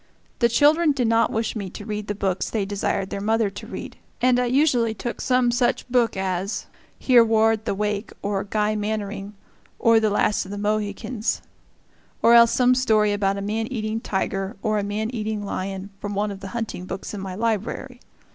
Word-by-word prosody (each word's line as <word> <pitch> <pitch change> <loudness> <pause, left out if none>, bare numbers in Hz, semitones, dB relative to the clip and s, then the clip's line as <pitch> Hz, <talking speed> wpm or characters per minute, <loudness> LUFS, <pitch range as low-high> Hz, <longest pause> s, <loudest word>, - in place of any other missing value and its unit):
The 235 - +4
children 300 +5 +4
did 250 -4 0
not 230 0 +3
wish 225 +1 -1
me 200 -4 -4
to 205 - -9
read 210 -1 -4
the 205 - -2
books 190 -2 -1
they 210 -3 -1
desired 195 -1 -2
their 200 - -3
mother 220 0 +1
to 195 - -9
read, - - -7 0.2
and 250 0 +3
I 250 - +1
usually 245 -4 +2
took 240 +2 -5
some 250 -2 +2
such 245 +1 0
book 240 -4 +2
as 190 +2 -2 0.3
"Hereward 225 -3 +4
the 210 - -1
Wake," 210 +1 -2
or 200 -1 -1
"Guy 210 +1 0
Mannering," 205 -1 -3 0.4
or 230 -1 +5
"The 220 -1 +2
Last 210 0 +1
of 185 - -11
the 205 - -5
Mohicans" 210 +2 -2 0.8
or 235 - +7
else 235 0 +8
some 250 +1 +4
story 215 -5 +3
about 200 -1 0
a - - -3
man 220 +2 -2
eating 220 -3 -3
tiger, 195 -1 -2
or 215 -2 +1
a - - -2
man 210 +3 -2
eating 215 -3 -3
lion, 195 0 -4
from 205 0 -4
one 205 +1 0
of 195 - -7
the 195 - -7
hunting 220 -5 -4
books 190 +3 -6
in 205 - -5
my 190 -1 -5
library. 230 +4 -2
215 Hz, 195 wpm, -23 LUFS, 200-230 Hz, 0.8 s, else